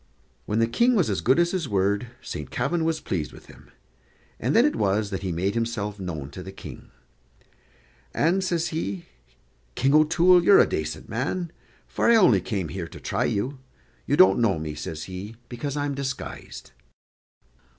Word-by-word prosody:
When 105 - -1
the 115 - +4
King 235 - +2
was 175 - +2
as 95 - -1
good 130 - +3
as 170 0 +3
his 175 -7 -2
word, 100 +3 +1 0.2
Saint 75 - -6
Kavin 150 +7 -1
was 160 0 0
pleased 80 -5 -3
with - - -14
him, - - -17 0.7
and 125 +6 0
then 235 - +6
it 300 - +1
was 100 +1 0
that 95 - -3
he 95 -2 -3
made 90 +4 -1
himself 110 -3 -2
known 80 -7 -5
to - - -8
the - - -8
King. - - -11 1.2
"And," 180 +5 +1
says 170 -3 0
he, 100 - -4 0.7
"King 135 +2 +2
O'Toole, 170 +4 +5
you're 200 +2 +7
a - - +7
dacent 75 0 -4
man, 155 - -3 0.4
for - - +1
I 235 - +7
only 125 - +5
came 95 -5 -3
here 90 -1 -5
to - - -11
try - - -1
you. 130 +7 -2 0.5
You - - +2
don't 95 +3 +6
know 110 -7 +2
me," 80 -1 -4
says 75 +1 -6
he, 95 +4 -7
"because 140 +4 -4
I'm 145 0 -1
disguised." 135 -1 -6
115 Hz, 180 wpm, -25 LUFS, 95-160 Hz, 1.2 s, you're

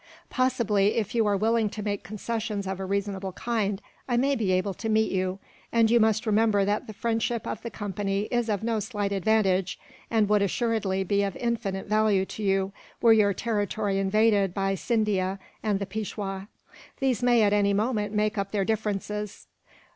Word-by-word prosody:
Possibly, 225 -6 +2
if 215 -3 -1
you 225 -2 +2
are 200 -1 +2
willing 220 +1 +2
to 210 +1 -6
make 205 -1 -2
concessions 215 +1 -4
of 190 0 -4
a 190 - -3
reasonable 195 -1 -2
kind, 205 -3 -1 0.3
I 240 - +2
may 275 +3 +2
be 215 -6 0
able 185 +2 +1
to 225 +5 -5
meet 220 0 +2
you 185 0 -1 0.3
and 230 -1 +3
you 235 - +5
must 220 0 +2
remember 215 -2 +3
that 205 +1 -1
the 215 - -7
friendship 230 +2 -1
of - - -4
the 235 - -5
Company 200 -2 -2
is 240 -2 0
of 205 -1 -1
no 225 -1 0
slight 205 -2 -3
advantage, 195 -2 +1 0.3
and 220 -2 +2
would 210 0 +3
assuredly 200 -2 0
be 200 +2 +1
of 200 -1 -1
infinite 225 -5 -2
value 215 -2 +2
to 215 - -8
you, 195 -1 +1 0.3
were 230 -1 +6
your 205 -3 +3
territory 205 -2 -1
invaded 200 -1 +2
by 195 0 0
Scindia 195 -3 0 0.2
and 210 -2 0
the 200 - -3
Peishwa. 195 -1 -5 0.5
These 260 -5 +1
may, 240 -2 +4
at 205 0 +3
any 200 -1 +3
moment, 210 -1 0
make 210 0 0
up 195 0 -2
their 200 -2 0
differences. 210 -1 -3
210 Hz, 185 wpm, -26 LUFS, 195-225 Hz, 0.5 s, were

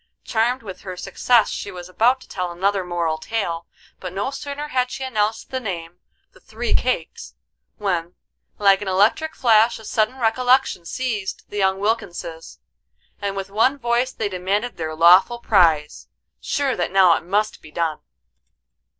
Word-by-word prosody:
Charmed 240 +2 0
with 190 -4 -9
her 185 -2 -7
success 235 +5 +2
she - - -5
was 180 -2 -8
about 240 +8 +2
to - - -15
tell 180 -2 -4
another 195 +2 0
moral 170 -3 -2
tale, 175 -7 -3 0.3
but 180 - -6
no 200 +8 -2
sooner 285 +1 -6
had 255 -3 0
she 265 +1 -6
announced 220 -4 -1
the 260 - -1
name, 175 -6 -6 0.3
"The - - -20
Three 230 +2 -4
Cakes," 170 - -1 0.4
when, 175 -4 -2 0.4
like 200 -1 +4
an 205 - -5
electric 210 +12 +2
flash 225 -2 +4
a 220 - -13
sudden 220 +5 0
recollection 245 -5 +2
seized 225 -7 -3
the 205 - -6
young 190 -1 +2
Wilkinses, 175 -6 -3 0.6
and 200 -1 -2
with 195 0 -5
one 240 +7 +2
voice 240 0 0
they 215 - -3
demanded 200 +5 -2
their 160 -2 -4
lawful 180 +8 +6
prize, 165 -10 +2 0.3
sure 280 -2 -1
that 175 - -1
now 185 -3 +6
it - - -3
must 205 +5 -1
be 155 - -13
done. 160 0 -2
205 Hz, 160 wpm, -22 LUFS, 180-240 Hz, 0.6 s, lawful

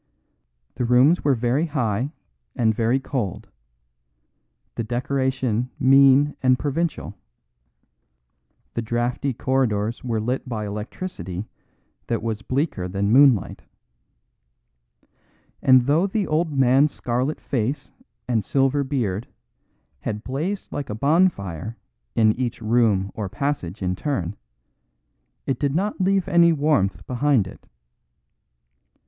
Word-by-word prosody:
The 125 - -1
rooms 125 +8 +4
were 140 -2 +3
very 125 +7 0
high 125 -3 -1 0.4
and 115 -4 +2
very 115 +4 +1
cold; 125 -8 -4 1.2
the 115 - -3
decoration 130 0 -1
mean 135 +2 +5
and 130 -1 +4
provincial; 150 +5 -2 1.6
the 115 - -2
draughty 120 +4 -1
corridors 120 -4 -1
were 115 -3 -1
lit 125 +4 -3
by 110 -3 -3
electricity 105 - -6 0.6
that 115 -2 -2
was 110 -2 -3
bleaker 130 - -2
than 100 +2 -1
moonlight. 130 -4 +4 2.0
And 130 -2 +6
though 155 +8 +3
the 200 +1 -1
old 160 +1 0
man's 135 +1 +4
scarlet 125 +5 -2
face 135 +3 -3 0.4
and 115 -4 +1
silver 135 +4 +1
beard 120 -7 -2 0.7
had 105 0 -4
blazed 160 +10 -4
like 145 - -4
a 105 - -3
bonfire 115 - 0 0.4
in 110 -2 +4
each 125 -3 -2
room 110 -4 +2
or 105 -3 -4
passage 110 - -3
in 90 0 0
turn, 100 - -3 1.1
it 135 -3 -2
did 140 -1 0
not 200 +3 -1
leave 190 -1 +2
any 170 -1 +5
warmth 140 - +1
behind 130 -3 +2
it. 95 - -13
125 Hz, 115 wpm, -23 LUFS, 110-145 Hz, 2.0 s, And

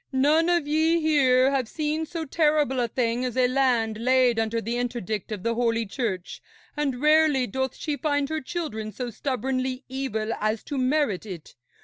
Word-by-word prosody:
None 300 +5 +3
of 345 -3 +2
ye 320 +3 +2
here 270 -4 +3
have 265 -4 0
seen 310 +1 -2
so 330 -1 -4
terrible 300 -3 +1
a 240 - +1
thing 235 +1 -1
as 250 -1 -3
a 255 -1 +4
land 245 -4 +1
laid 250 -1 +3
under 225 +1 0
the 230 +2 -3
interdict 235 -4 -3
of 205 -3 -5
the 230 - 0
Holy 230 -1 0
Church, 195 -4 -4 0.3
and 280 -4 -1
rarely 300 -2 +4
doth 265 +3 -3
she 300 -2 -3
find 290 -2 0
her 315 0 -2
children 245 -9 -4
so 245 +1 -5
stubbornly 255 +2 -2
evil 230 -5 -2
as 215 +1 -1
to 285 - -4
merit 255 -7 0
it. 175 -5 -9
255 Hz, 175 wpm, -25 LUFS, 230-295 Hz, 0.3 s, a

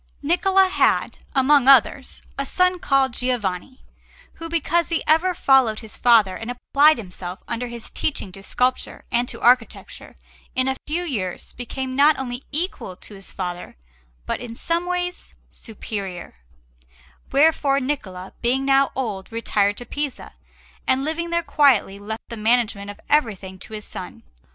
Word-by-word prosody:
Niccola 380 +5 +3
had, 375 - +1 0.2
among 270 0 +4
others, 270 0 +4
a 275 - -2
son 365 +5 +1
called 275 -5 +2
Giovanni, 245 -1 -2 0.5
who, 330 0 -8
because 335 +1 +1
he 335 - 0
ever 335 +4 +3
followed 260 -8 +3
his 220 -2 -9
father 220 -6 +4
and 225 +5 -7
applied 285 +4 +3
himself 185 -3 -8
under 240 +1 -3
his 235 -1 -8
teaching 210 -10 -3
to 195 - -12
sculpture 250 +5 -1
and 240 0 +1
to - - -7
architecture, 245 -1 +1 0.4
in 255 0 +1
a 265 - 0
few 330 +4 -1
years 205 - -4
became 255 +2 -5
not 295 +3 +5
only 250 -1 -4
equal 300 - -2
to 210 - -10
his 195 -1 -7
father 180 -2 -6 0.5
but - - -2
in 235 -2 -7
some 340 +6 -1
ways 360 0 -3 0.2
superior; 200 -5 -7 1.0
wherefore 280 -1 +3
Niccola, 195 -10 -4
being 260 +3 +1
now 275 0 +4
old, 215 -7 -4
retired 205 -3 0
to 245 - -8
Pisa, 285 +2 -5 0.6
and 260 +1 +2
living 335 +2 -2
there 340 0 0
quietly 255 -12 +3
left 220 +3 -6
the 230 - -6
management 220 -2 +1
of 205 - -9
everything 205 -10 0
to 220 - -11
his 210 -1 -6
son. - - -8
255 Hz, 150 wpm, -22 LUFS, 215-295 Hz, 1.0 s, not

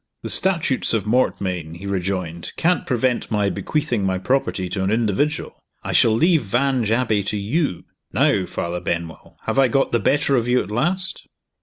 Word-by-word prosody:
"The - - -3
Statutes 165 -11 +1
of 105 - -1
Mortmain," 95 -8 0
he 90 +4 -9
rejoined, 90 -3 -3
"can't 175 +2 +1
prevent 125 -1 0
my 105 -3 +1
bequeathing 145 -9 -1
my 95 -1 0
property 95 -3 0
to 95 +1 -2
an 95 - 0
individual. 115 +7 -1 0.2
I - - -3
shall 110 - +4
leave 160 +6 +3
Vange 120 +2 0
Abbey 115 -3 +2
to 105 - -2
You. 105 - -1 0.3
Now, 95 -2 +2
Father 85 +1 -3
Benwell! 85 -2 -5
have - - 0
I 135 - +6
got 135 +3 +1
the 115 - +2
better 145 +1 +2
of 120 -2 +1
you 125 +1 +3
at 100 - -10
last?" 175 - -1
110 Hz, 175 wpm, -21 LUFS, 95-135 Hz, 0.3 s, I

